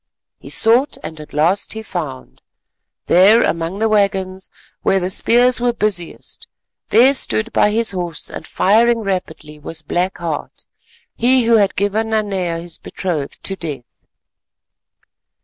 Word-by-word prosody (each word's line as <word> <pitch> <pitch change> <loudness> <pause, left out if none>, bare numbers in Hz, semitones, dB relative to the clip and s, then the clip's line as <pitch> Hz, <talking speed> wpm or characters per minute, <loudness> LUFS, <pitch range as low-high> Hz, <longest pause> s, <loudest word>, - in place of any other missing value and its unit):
He - - -12
sought—and 225 - +2
at 150 - -11
last 170 +7 +1
he 220 0 -7
found. 155 -10 -7 0.6
There, 200 +6 +5
among 165 +3 -2
the 220 +2 +1
waggons 195 -3 0 0.3
where 195 - +2
the 185 0 -2
spears 245 +5 +3
were 240 -1 +1
busiest, 200 -7 -3 0.4
there 250 +5 +5
standing 230 -4 +2
by - - +3
his 225 +1 +1
horse 175 -4 -3
and - - -8
firing 230 +4 +2
rapidly 170 -6 -5
was 160 +2 -7
Black 180 +5 -2
Heart, 165 -3 -6 0.5
he 250 +2 +3
who 230 0 +4
had 200 -2 +2
given 210 +3 -1
Nanea 195 -6 -1
his 170 -1 -8
betrothed 160 -7 -5
to 195 - -2
death. 145 -9 -9
195 Hz, 135 wpm, -18 LUFS, 170-220 Hz, 0.6 s, There